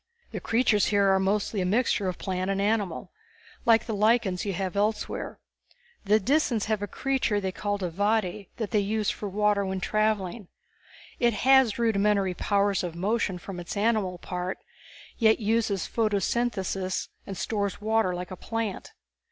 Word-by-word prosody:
The - - -4
creatures 225 -3 +2
here 200 -2 +3
are 190 - +3
mostly 200 +1 0
a - - 0
mixture 205 -1 +1
of 180 - -2
plant 185 -1 -2
and 195 0 0
animal, 205 -3 -1 0.6
like 230 -1 +5
the 225 - -3
lichens 215 -2 +2
you 200 - -1
have 185 +1 -3
elsewhere. 210 +2 -1 0.7
The 210 +2 +4
Disans 245 -1 +1
have 215 -1 -1
a 205 - -2
creature 260 -4 0
they 190 -2 -2
call 205 +2 -2
a 175 - -2
"vaede" 205 0 0
that 220 -3 -3
they 215 - +3
use 210 +1 0
for 205 - -5
water 205 0 +2
when 190 -1 -2
traveling. 215 -1 -1 0.7
It 240 -1 +3
has 265 -5 +5
rudimentary 205 -4 +2
powers 200 +1 +1
of 170 -2 -4
motion 195 +1 0
from 180 0 -8
its 175 +4 -6
animal 205 -4 +1
part, 180 +1 -4 0.6
yet 220 -2 +4
uses 215 -3 0
photosynthesis 205 -3 -1 0.2
and 195 - -6
stores 200 0 -2
water 220 -3 +1
like 180 +1 -6
a - - -4
plant. 225 +1 -4
205 Hz, 160 wpm, -27 LUFS, 190-220 Hz, 0.7 s, like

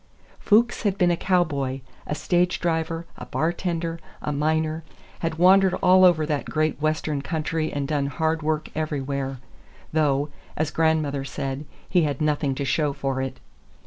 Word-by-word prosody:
Fuchs 230 +3 +3
had 200 -2 0
been 180 -3 +4
a - - +2
cowboy, 145 -8 0 0.3
a 150 - -2
stage 175 +3 +1
driver, 165 -1 -1
a - - -8
bar 165 +2 0
tender, 170 -2 -3 0.2
a 150 - -3
miner; 155 +2 0 0.4
had 165 -1 -2
wandered 190 +2 +5
all 185 +1 +5
over 170 -4 +5
that 150 -2 -1
great 155 -1 0
Western 155 -2 0
country 155 +1 -2
and 140 -1 -2
done 145 -2 0
hard 160 +3 0
work 155 0 -1
everywhere, 140 -3 -2 0.6
though, 145 -2 +2 0.3
as 155 0 0
grandmother 155 -4 +1
said, 135 +1 -4 0.2
he 180 - +3
had 145 -4 -1
nothing 150 -3 +1
to 140 - -2
show 145 +1 +1
for 135 -1 -2
it. 135 0 -4
155 Hz, 160 wpm, -24 LUFS, 145-165 Hz, 0.6 s, wandered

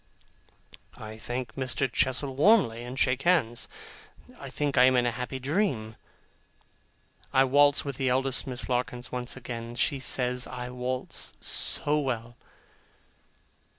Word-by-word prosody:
I 110 0 -9
thank 120 +3 -4
Mr. 130 0 -1
Chestle 130 +1 0
warmly, 145 - +4
and 125 +2 -7
shake 130 -1 +2
hands. 135 -9 +2 0.7
I - - -7
think 145 -2 -2
I 125 -1 +7
am 130 0 +4
in 120 -1 +3
a 120 - +1
happy 125 +2 -5
dream. 130 - -1 1.4
I 135 - +5
waltz 145 +2 +4
with 140 -2 -4
the 135 -2 +1
eldest 135 +1 +1
Miss 125 -1 -3
Larkins 125 0 -2
once 125 0 -3
again. 120 -2 -6
She 140 +3 0
says 125 -1 +2
I 125 -1 -6
waltz 125 +1 -3
so 150 +1 0
well! 120 -4 -3
130 Hz, 135 wpm, -28 LUFS, 120-135 Hz, 1.4 s, I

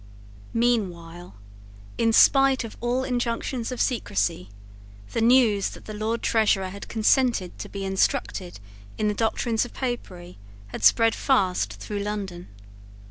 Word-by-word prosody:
Meanwhile, 175 - -1 0.6
in 225 0 +3
spite 270 +2 +5
of 225 - -8
all 245 +2 0
injunctions 245 -1 -2
of 250 - -5
secrecy, 100 - -1 0.6
the - - -1
news 230 -4 +4
that - - -12
the 215 - -7
Lord 220 +2 -3
Treasurer 210 -4 +2
had 200 +2 -9
consented 225 -3 +1
to - - -7
be 195 -1 -5
instructed 190 - -1 0.4
in 210 -1 +1
the - - 0
doctrines 225 +1 0
of 245 - -9
Popery 185 - -5 0.3
had - - -7
spread 225 -1 +5
fast 185 - +1
through 150 - -6
London. 200 -4 -5
220 Hz, 135 wpm, -25 LUFS, 190-240 Hz, 0.6 s, spite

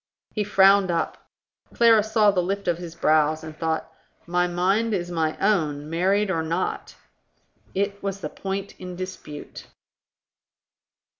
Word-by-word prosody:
He 210 - 0
frowned 195 -1 +5
up. 170 -1 -2 0.5
Clara 230 -2 +6
saw 215 -1 +3
the 185 -2 +1
lift 195 +2 -3
of 175 -1 +1
his 170 -2 -8
brows, 155 -1 +2
and 155 -1 -8
thought, 160 0 -2 0.3
"My 180 +1 +1
mind 195 +6 +1
is 175 -1 -3
my 160 -2 -1
own, 155 -7 0
married 190 +4 +2
or 165 -3 0
not." 165 +3 -3 0.8
It 200 +1 -1
was 195 0 -3
the - - -5
point 195 +1 -5
in 180 -1 -7
dispute. 185 -5 -8
180 Hz, 140 wpm, -24 LUFS, 165-200 Hz, 0.8 s, Clara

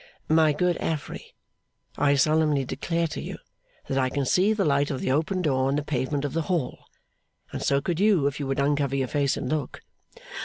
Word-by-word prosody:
'My 160 -1 +4
good 175 +3 +1
Affery, 155 -3 -5 0.6
I 145 -1 +3
solemnly 150 -1 +2
declare 170 +6 -2
to - - -5
you - - -6 0.5
that 135 - 0
I 130 -1 +1
can 140 +1 -2
see 185 +10 +3
the 210 -3 +1
light 140 0 +2
of 135 - -3
the - - -1
open 165 +6 0
door 130 -4 +1
on 135 - +1
the 145 - -1
pavement 140 0 -2
of 145 - -3
the 165 - 0
hall, 165 -9 -2 0.7
and - - -5
so 140 0 +2
could 175 +1 -2
you 200 -8 +3
if 140 0 -1
you 140 - -3
would 135 - -1
uncover 140 -1 +1
your 135 -1 0
face 140 0 0
and 140 - -4
look. 150 -1 -3
145 Hz, 205 wpm, -25 LUFS, 135-160 Hz, 0.7 s, My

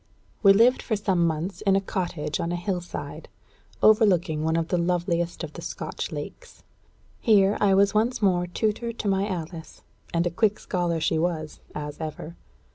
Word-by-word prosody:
We 195 - +7
lived 230 +6 +5
for 220 - -1
some 190 -5 +1
months 165 +6 -3
in 195 -2 +3
a - - +4
cottage 175 -6 -3
on 170 - -2
a - - -1
hill 175 +1 -2
side, 175 - -8 0.5
overlooking 185 -8 +4
one 160 +1 +1
of 165 0 -1
the 180 - +1
loveliest 170 0 -1
of - - -6
the - - -8
Scotch - - -5
lakes. - - -8 0.6
Here 205 -3 +4
I 200 -2 +4
was 200 0 +4
once 225 +4 +1
more 180 -4 +2
tutor 220 +5 -2
to 220 - -5
my 195 0 +1
Alice. 165 -3 -6 0.3
And 170 +1 +1
a 175 - 0
quick 210 +3 +1
scholar 175 -3 -1
she 160 0 +1
was, 160 -2 -2 0.2
as 150 +1 -6
ever. 160 +1 -6
180 Hz, 180 wpm, -25 LUFS, 170-200 Hz, 0.6 s, We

